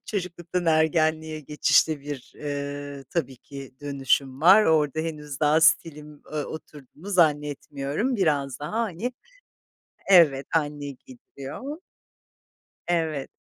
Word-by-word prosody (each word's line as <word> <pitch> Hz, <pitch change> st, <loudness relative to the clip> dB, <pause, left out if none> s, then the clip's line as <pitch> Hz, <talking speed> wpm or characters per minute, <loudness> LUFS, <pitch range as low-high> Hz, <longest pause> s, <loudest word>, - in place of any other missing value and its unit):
çocukluktan 180 Hz, -3 st, -3 dB
ergenliğe 160 Hz, 0 st, +2 dB
geçişte 150 Hz, +1 st, +2 dB
bir, 140 Hz, -2 st, -8 dB
eee, 145 Hz, -1 st, -5 dB
tabii 135 Hz, -6 st, -2 dB
ki 135 Hz, 0 st, -11 dB
dönüşüm 135 Hz, -1 st, 0 dB
var. 195 Hz, +6 st, +7 dB
Orada 155 Hz, -1 st, +2 dB
henüz 150 Hz, -3 st, -6 dB
daha 150 Hz, +2 st, +4 dB
stilim, 150 Hz, -2 st, +1 dB
ııı, 150 Hz, -2 st, -2 dB
oturduğunu 155 Hz, +3 st, -11 dB
zannetmiyorum, 150 Hz, -, 0 dB
biraz 145 Hz, -8 st, 0 dB
daha, 150 Hz, -, -6 dB
hani 230 Hz, +3 st, -3 dB, 1.0 s
Evet, 150 Hz, -7 st, +6 dB
anne 145 Hz, -2 st, -1 dB
giydiriyor. 250 Hz, -, -9 dB, 1.1 s
Evet. 160 Hz, -5 st, -1 dB
150 Hz, 105 wpm, -25 LUFS, 140-165 Hz, 1.1 s, var